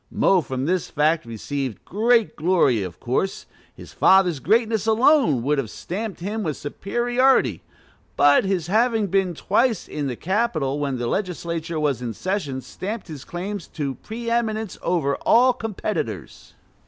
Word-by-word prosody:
Mo 190 Hz, -2 st, +3 dB
from 130 Hz, -1 st, -4 dB
this 180 Hz, +2 st, 0 dB
fact 155 Hz, -2 st, +1 dB
received 130 Hz, +2 st, -5 dB
great 225 Hz, -2 st, +2 dB
glory, 160 Hz, -, +2 dB
of 90 Hz, -3 st, -6 dB
course; 160 Hz, +11 st, -2 dB, 0.3 s
his -, -, -12 dB
father's 185 Hz, -6 st, +4 dB
greatness 220 Hz, -, +1 dB
alone 225 Hz, -, +4 dB
would 145 Hz, +2 st, +1 dB
have 120 Hz, -6 st, -3 dB
stamped 195 Hz, -, -5 dB
him 210 Hz, +4 st, -3 dB
with 155 Hz, -7 st, -2 dB
superiority; 240 Hz, -, +1 dB, 0.6 s
but 145 Hz, 0 st, +5 dB
his 190 Hz, -4 st, -1 dB
having 220 Hz, +3 st, +2 dB
been 190 Hz, -2 st, 0 dB
twice 225 Hz, +4 st, +1 dB
in 145 Hz, -2 st, -3 dB
the 125 Hz, -, -3 dB
"Capitol" 165 Hz, -, -1 dB
when 140 Hz, -3 st, -1 dB
the 120 Hz, -, -3 dB
legislature 170 Hz, -, -3 dB
was 140 Hz, -5 st, 0 dB
in 115 Hz, -3 st, -4 dB
session 170 Hz, -, -3 dB
stamped 195 Hz, -, -6 dB
his 150 Hz, -4 st, -8 dB
claims 190 Hz, +2 st, -5 dB
to 140 Hz, -4 st, -4 dB
pre 230 Hz, -, -8 dB
eminence 220 Hz, -3 st, -1 dB
over 160 Hz, -6 st, 0 dB
all 250 Hz, +2 st, +4 dB
competitors. 210 Hz, -, -5 dB
180 Hz, 150 wpm, -23 LUFS, 140-220 Hz, 0.6 s, but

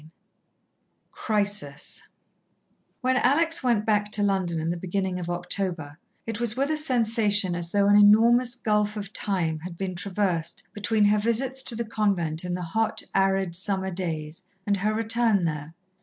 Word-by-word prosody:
XVIII 155 Hz, +1 st, -18 dB, 1.0 s
Crisis 205 Hz, -9 st, -2 dB, 1.0 s
When 255 Hz, 0 st, +1 dB
Alex 325 Hz, +5 st, +2 dB
went 235 Hz, -5 st, +1 dB
back 210 Hz, -1 st, +1 dB
to 205 Hz, -, +4 dB
London 190 Hz, -4 st, 0 dB
in 160 Hz, +1 st, -2 dB
the -, -, -2 dB
beginning 185 Hz, +1 st, -3 dB
of 175 Hz, -1 st, -5 dB
October, 175 Hz, -3 st, -2 dB, 0.3 s
it 225 Hz, -1 st, -4 dB
was 235 Hz, -1 st, 0 dB
with 275 Hz, +3 st, 0 dB
a -, -, +1 dB
sensation 225 Hz, -, +2 dB
as 175 Hz, -1 st, -3 dB
though 200 Hz, +2 st, +2 dB
an 205 Hz, -, +5 dB
enormous 230 Hz, +4 st, +5 dB
gulf 210 Hz, -2 st, 0 dB
of 200 Hz, -1 st, -7 dB
time 170 Hz, -6 st, 0 dB
had 170 Hz, +1 st, -9 dB
been 190 Hz, 0 st, -3 dB
traversed 180 Hz, -3 st, -2 dB
between 210 Hz, 0 st, +1 dB
her 210 Hz, +1 st, +3 dB
visits 250 Hz, +5 st, 0 dB
to 235 Hz, -, -2 dB
the 235 Hz, +1 st, -3 dB
convent 190 Hz, -8 st, -1 dB
in 180 Hz, -1 st, -3 dB
the 180 Hz, -, -5 dB
hot, 220 Hz, +6 st, -1 dB
arid 195 Hz, -2 st, +1 dB
summer 190 Hz, 0 st, 0 dB
days 165 Hz, -2 st, -4 dB, 0.2 s
and 200 Hz, -1 st, +1 dB
her 210 Hz, +3 st, -1 dB
return 225 Hz, -3 st, +2 dB
there. 155 Hz, 0 st, -4 dB
200 Hz, 165 wpm, -25 LUFS, 175-220 Hz, 1.0 s, an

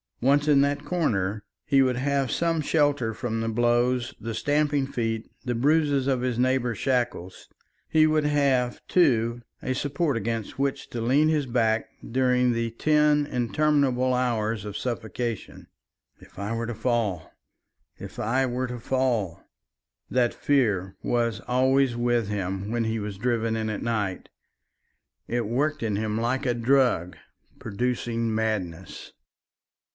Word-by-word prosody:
Once 140 Hz, +4 st, +3 dB
in 145 Hz, -2 st, +5 dB
that 145 Hz, +1 st, 0 dB
corner, 110 Hz, -, -1 dB, 0.2 s
he 135 Hz, -2 st, +4 dB
would 130 Hz, -2 st, +2 dB
have 135 Hz, -1 st, 0 dB
some 165 Hz, -1 st, +1 dB
shelter 145 Hz, -6 st, +1 dB
from 115 Hz, -1 st, -3 dB
the 115 Hz, -, -1 dB
blows, 120 Hz, +2 st, +1 dB
the 115 Hz, +1 st, -5 dB
stamping 145 Hz, +2 st, +1 dB
feet, 115 Hz, -4 st, -3 dB, 0.2 s
the 120 Hz, -1 st, -1 dB
bruises 145 Hz, +1 st, +2 dB
of 130 Hz, -3 st, +1 dB
his 125 Hz, -2 st, -1 dB
neighbour's 125 Hz, -2 st, +1 dB
shackles; 120 Hz, -8 st, -2 dB, 0.4 s
he 155 Hz, -1 st, +4 dB
would 155 Hz, -1 st, +2 dB
have, 140 Hz, -4 st, +1 dB
too, 120 Hz, -9 st, +2 dB, 0.2 s
a 130 Hz, -, -1 dB
support 145 Hz, +1 st, -1 dB
against 115 Hz, +2 st, -3 dB
which 140 Hz, 0 st, -1 dB
to 120 Hz, -, -4 dB
lean 135 Hz, +7 st, +3 dB
his 155 Hz, -3 st, +1 dB
back 115 Hz, -2 st, +1 dB, 0.2 s
during 125 Hz, 0 st, +2 dB
the 115 Hz, 0 st, -1 dB
ten 150 Hz, +3 st, +2 dB
interminable 130 Hz, 0 st, +1 dB
hours 115 Hz, -4 st, 0 dB
of 105 Hz, -1 st, -5 dB
suffocation. 120 Hz, -2 st, -4 dB, 0.5 s
"If -, -, -18 dB
I 100 Hz, +3 st, -3 dB
were 115 Hz, 0 st, -3 dB
to 120 Hz, -, -4 dB
fall! 110 Hz, -9 st, -1 dB, 0.7 s
If -, -, -9 dB
I 130 Hz, +5 st, +1 dB
were 130 Hz, +1 st, -2 dB
to 125 Hz, 0 st, -6 dB
fall!" 120 Hz, -8 st, -1 dB, 0.7 s
That 125 Hz, -2 st, +2 dB
fear 105 Hz, -10 st, +1 dB
was 115 Hz, -3 st, 0 dB
always 130 Hz, 0 st, +2 dB
with 120 Hz, -2 st, +1 dB
him 95 Hz, 0 st, -3 dB
when 120 Hz, 0 st, 0 dB
he 110 Hz, 0 st, -1 dB
was 105 Hz, -2 st, -5 dB
driven 115 Hz, 0 st, 0 dB
in 110 Hz, -1 st, -2 dB
at 105 Hz, -, -4 dB
night. 105 Hz, -5 st, -2 dB, 1.0 s
It 120 Hz, 0 st, -1 dB
worked 145 Hz, +6 st, 0 dB
in 110 Hz, -3 st, 0 dB
him 110 Hz, +1 st, -1 dB
like 120 Hz, +4 st, -1 dB
a 120 Hz, -, +1 dB
drug 120 Hz, -8 st, +2 dB, 0.4 s
producing 115 Hz, 0 st, -2 dB
madness. 95 Hz, -6 st, -3 dB
120 Hz, 145 wpm, -26 LUFS, 110-135 Hz, 1.0 s, in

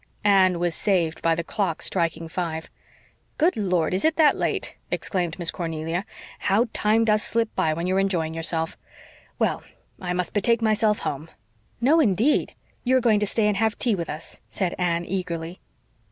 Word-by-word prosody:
Anne 190 Hz, -3 st, +4 dB
was 175 Hz, -1 st, 0 dB
saved 170 Hz, -6 st, 0 dB
by 165 Hz, 0 st, +2 dB
the 170 Hz, -, -2 dB
clock 185 Hz, -3 st, -2 dB
striking 165 Hz, -2 st, -1 dB
five. 160 Hz, -1 st, -4 dB, 0.8 s
"Lord, 180 Hz, -6 st, 0 dB
is 185 Hz, -, 0 dB
it 315 Hz, 0 st, +3 dB
that 310 Hz, -3 st, +5 dB
late?" -, -, -2 dB
exclaimed 175 Hz, -3 st, -2 dB
Miss 170 Hz, -2 st, -1 dB
Cornelia. 165 Hz, +2 st, -3 dB, 0.3 s
"How 220 Hz, +5 st, +2 dB
time 220 Hz, +2 st, +2 dB
does 215 Hz, -1 st, +3 dB
slip 230 Hz, 0 st, -1 dB
by 155 Hz, -1 st, +1 dB
when 170 Hz, +2 st, -3 dB
you're 185 Hz, +1 st, +1 dB
enjoying 175 Hz, -5 st, 0 dB
yourself! 165 Hz, 0 st, -2 dB, 0.6 s
Well, -, -, 0 dB, 0.4 s
I 180 Hz, -1 st, -2 dB
must 180 Hz, -1 st, -2 dB
betake 230 Hz, +3 st, +2 dB
myself 215 Hz, -1 st, +3 dB
home." 150 Hz, +3 st, -4 dB, 0.5 s
"No, 285 Hz, +8 st, +4 dB
indeed! 230 Hz, -, +2 dB, 0.3 s
You 260 Hz, +1 st, +3 dB
are -, -, +4 dB
going 225 Hz, -4 st, +3 dB
to 210 Hz, -, 0 dB
stay 215 Hz, +1 st, +1 dB
and 210 Hz, -2 st, +2 dB
have 220 Hz, +1 st, +1 dB
tea 235 Hz, -, +2 dB
with 170 Hz, -4 st, -3 dB
us," 155 Hz, +2 st, -5 dB
said 185 Hz, -3 st, -2 dB
Anne 170 Hz, -1 st, 0 dB
eagerly. 175 Hz, -2 st, -4 dB
185 Hz, 170 wpm, -24 LUFS, 165-215 Hz, 0.8 s, that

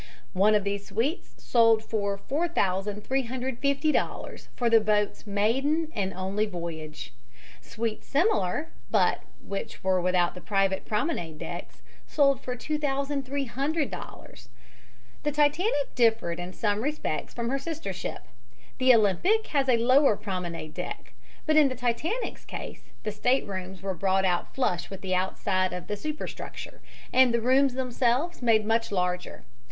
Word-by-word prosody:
One 205 Hz, +3 st, +4 dB
of 205 Hz, -, +2 dB
these 200 Hz, 0 st, -3 dB
suites 235 Hz, -, -2 dB
was -, -, -22 dB
sold 230 Hz, -2 st, +4 dB
for 200 Hz, -3 st, -1 dB
$4350 260 Hz, -, -1 dB
for 240 Hz, -, 0 dB
the 230 Hz, -1 st, +6 dB
boat's 210 Hz, 0 st, 0 dB
maiden 270 Hz, +11 st, +1 dB
and 195 Hz, -3 st, -1 dB
only 195 Hz, +3 st, -1 dB
voyage. 160 Hz, -7 st, -6 dB, 0.5 s
Suites 225 Hz, -1 st, -4 dB
similar, 290 Hz, -, +1 dB, 0.2 s
but -, -, +2 dB, 0.2 s
which 195 Hz, -, -6 dB
were 185 Hz, -1 st, +2 dB
without 180 Hz, -1 st, +2 dB
the 180 Hz, -, -10 dB
private 195 Hz, -1 st, +1 dB
promenade 210 Hz, -, -2 dB
decks, -, -, -7 dB, 0.2 s
sold 275 Hz, -2 st, +3 dB
for 250 Hz, -, -4 dB
$2300. 280 Hz, 0 st, -3 dB, 0.7 s
The 295 Hz, -, 0 dB
Titanic 295 Hz, -, +2 dB
differed 225 Hz, -8 st, +2 dB
in 175 Hz, +1 st, -5 dB
some 205 Hz, +2 st, 0 dB
respects 295 Hz, -, -3 dB
from 235 Hz, -1 st, -2 dB
her 275 Hz, +2 st, 0 dB
sister 320 Hz, +2 st, -4 dB
ship. -, -, -5 dB, 0.6 s
The 255 Hz, -1 st, +7 dB
Olympic 230 Hz, -, +3 dB
has 275 Hz, -2 st, +2 dB
a 240 Hz, -, +5 dB
lower 255 Hz, +1 st, +5 dB
promenade 175 Hz, -6 st, -5 dB
deck, -, -, -6 dB, 0.3 s
but 310 Hz, -, +2 dB
in 295 Hz, -3 st, +6 dB
the 255 Hz, -, -4 dB
Titanic's 255 Hz, -, -2 dB
case -, -, -8 dB
the 215 Hz, -, -2 dB
staterooms 195 Hz, -5 st, -1 dB
were 195 Hz, -1 st, -1 dB
brought 190 Hz, +2 st, +1 dB
out 175 Hz, -2 st, 0 dB
flush 180 Hz, -10 st, 0 dB
with 195 Hz, -1 st, -8 dB
the 185 Hz, -1 st, -2 dB
outside 185 Hz, 0 st, 0 dB
of 180 Hz, -1 st, -5 dB
the 210 Hz, -, -3 dB
superstructure, 305 Hz, +8 st, -6 dB, 0.3 s
and 255 Hz, -1 st, +6 dB
the 235 Hz, -, +2 dB
rooms 260 Hz, +2 st, +3 dB
themselves 255 Hz, +5 st, 0 dB
made 225 Hz, -3 st, +3 dB
much 225 Hz, +1 st, +1 dB
larger. 180 Hz, -, -2 dB
230 Hz, 140 wpm, -27 LUFS, 195-275 Hz, 0.7 s, The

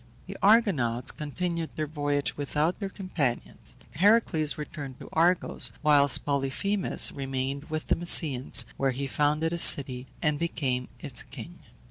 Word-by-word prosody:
The -, -, -10 dB
Argonauts 175 Hz, -, +1 dB
continued 165 Hz, +2 st, -5 dB
their 155 Hz, -, -3 dB
voyage 145 Hz, -1 st, -3 dB
without 150 Hz, +4 st, -2 dB
their 200 Hz, -2 st, -5 dB
companions; 175 Hz, -, -5 dB, 0.2 s
Heracles 180 Hz, -4 st, +1 dB
returned 145 Hz, -4 st, -9 dB
to -, -, -12 dB
Argos, 170 Hz, +2 st, +2 dB
whilst 145 Hz, -3 st, +4 dB
Polyphemus 145 Hz, +8 st, 0 dB
remained 135 Hz, +1 st, -5 dB
with 155 Hz, -1 st, -6 dB
the -, -, 0 dB
Mysians, 150 Hz, -6 st, +3 dB
where 135 Hz, -, 0 dB
he 140 Hz, -, -4 dB
founded 150 Hz, +4 st, -1 dB
a 170 Hz, -, -4 dB
city 130 Hz, -5 st, +6 dB
and 150 Hz, -3 st, -2 dB
became 130 Hz, -7 st, -3 dB
its -, -, -7 dB
king. -, -, -12 dB
150 Hz, 135 wpm, -26 LUFS, 135-170 Hz, 0.2 s, city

